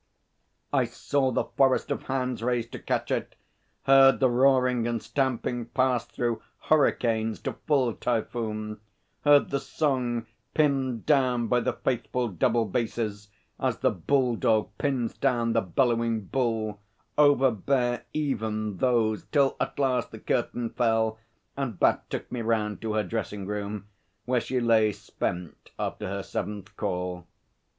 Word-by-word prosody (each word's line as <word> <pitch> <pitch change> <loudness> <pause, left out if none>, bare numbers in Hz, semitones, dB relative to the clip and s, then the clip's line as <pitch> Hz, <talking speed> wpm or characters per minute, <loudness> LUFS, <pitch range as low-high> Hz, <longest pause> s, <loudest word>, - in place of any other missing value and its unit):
I - - +3
saw 140 -2 0
the - - +1
forest 135 +1 +2
of 140 - -1
hands 130 -3 -1
raised 120 -1 -1
to - - -6
catch - - -2
it, - - -2 0.5
heard 135 0 +6
the 130 -2 +3
roaring 125 -2 +3
and 120 -1 -1
stamping 120 0 -1
pass 130 -1 +1
through 120 -2 -2 0.2
hurricanes 115 -7 +1
to - - -3
full 135 -6 +3
typhoon; 110 -3 -2 0.4
heard 145 -1 +5
the 140 - +1
song, 125 -6 -1 0.3
pinned 135 -6 +1
down 130 -5 +3
by 125 +2 +2
the - - -1
faithful 125 -1 -1
double 110 +5 +1
basses 105 -1 -3 0.3
as - - 0
the - - +2
bull 125 - +1
dog 110 -1 +1
pins 130 -5 -1
down 120 -4 +1
the 115 - +3
bellowing 115 +2 +1
bull, 110 -3 -1 0.4
overbear 130 -3 +3
even 110 -8 -2
those; 115 -3 +1
till 140 -3 +2
at - - -2
last 130 -3 +1
the - - -9
curtain 120 -2 -1
fell 110 -1 +1 0.4
and 130 -8 -3
Bat - - +2
took - - -5
me 125 - -3
round 110 -2 -1
to 110 -1 -2
her 110 0 +1
dressing 105 -3 -4
room, 105 0 -4 0.4
where 125 0 +1
she 130 - -1
lay 110 -3 +3
spent 90 -3 -5
after - - -3
her 100 +1 -3
seventh 105 -2 -5
call. 90 -3 -3
120 Hz, 145 wpm, -27 LUFS, 110-130 Hz, 0.5 s, heard